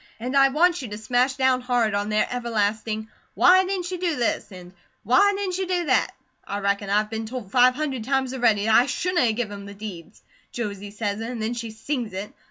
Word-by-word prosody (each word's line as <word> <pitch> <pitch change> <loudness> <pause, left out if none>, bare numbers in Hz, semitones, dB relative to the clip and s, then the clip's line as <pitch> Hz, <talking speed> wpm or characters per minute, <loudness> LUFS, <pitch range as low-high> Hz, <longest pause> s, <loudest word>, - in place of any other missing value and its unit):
And 250 +4 -4
I 275 0 +7
want 340 +4 +2
you 255 - -6
to 210 -1 -6
smash 245 +4 +1
down 260 -1 +2
hard 245 -4 +1
on 205 +1 -1
their 215 0 +1
everlasting, 220 -2 -1 0.3
'why 370 +1 +6
didn't 370 -2 -3
you 365 - -4
do 345 -3 0
this?' 235 -3 -1
and 180 -1 -11 0.3
'why 405 - +4
didn't 380 -2 -2
you 380 - -2
do 355 -1 0
that?' 255 -4 +1 0.3
I 200 - -4
reckon 200 0 -1
I've 210 +1 +1
been 220 0 -4
told 230 -5 -7
five 250 +1 +5
hundred 275 -5 -3
times 265 +1 0
a 265 - -5
ready 215 -4 +3
that 220 - +3
I 240 - +6
shouldn't 360 +2 0
a 235 - +3
give 220 -1 -3
him 200 0 -8
the 200 - -10
deeds. 195 -6 -9 0.3
Josie 205 -3 -5
say 205 0 -2
it, 200 +2 -6
an' 235 +2 -4
then 220 +1 -2
she 230 -1 -5
sings 225 0 -4
it. 195 +2 -6
235 Hz, 230 wpm, -24 LUFS, 210-270 Hz, 0.3 s, I